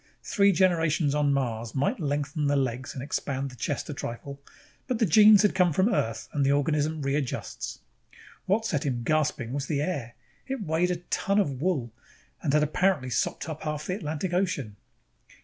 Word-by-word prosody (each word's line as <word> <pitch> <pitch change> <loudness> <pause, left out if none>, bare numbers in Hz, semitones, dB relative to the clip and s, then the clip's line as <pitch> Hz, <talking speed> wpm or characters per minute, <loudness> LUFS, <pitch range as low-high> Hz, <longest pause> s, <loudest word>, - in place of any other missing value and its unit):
Three 200 -1 +3
generations 165 -5 +2
on 145 -1 +2
Mars 115 -4 -2
might 135 +1 0
lengthen 145 -1 -1
the 145 - +2
legs 130 -1 -2
and 130 - -5
expand 140 -1 -3
the - - -12
chest 120 - -3
a - - -4
trifle, 140 +4 -6 0.5
but 255 -3 0
the 225 - +3
genes 210 +2 +7
had 210 - +3
come 180 -2 +3
from 195 +8 +2
Earth 115 - -1
and 145 - +1
the 135 - +3
organism 150 +1 +1
readjusts. 140 -1 -3 0.7
What 215 +4 +2
set 150 -10 0
him 125 -4 -2
gasping 145 -4 0
was 140 -1 -3
the 145 -2 0
air. 140 -9 -3 0.3
It 265 -5 -3
weighed 165 +1 +1
like 180 - 0
a - - -19
ton 200 +1 +1
of 140 -10 0
wool 145 -10 -1 0.5
and 150 - 0
had 150 +1 +4
apparently 150 -4 +1
sopped 140 - -1
up 155 -1 -6
half 150 -1 -3
the 180 - -2
Atlantic 165 0 -3
Ocean. 175 - -1
150 Hz, 185 wpm, -27 LUFS, 135-180 Hz, 0.7 s, genes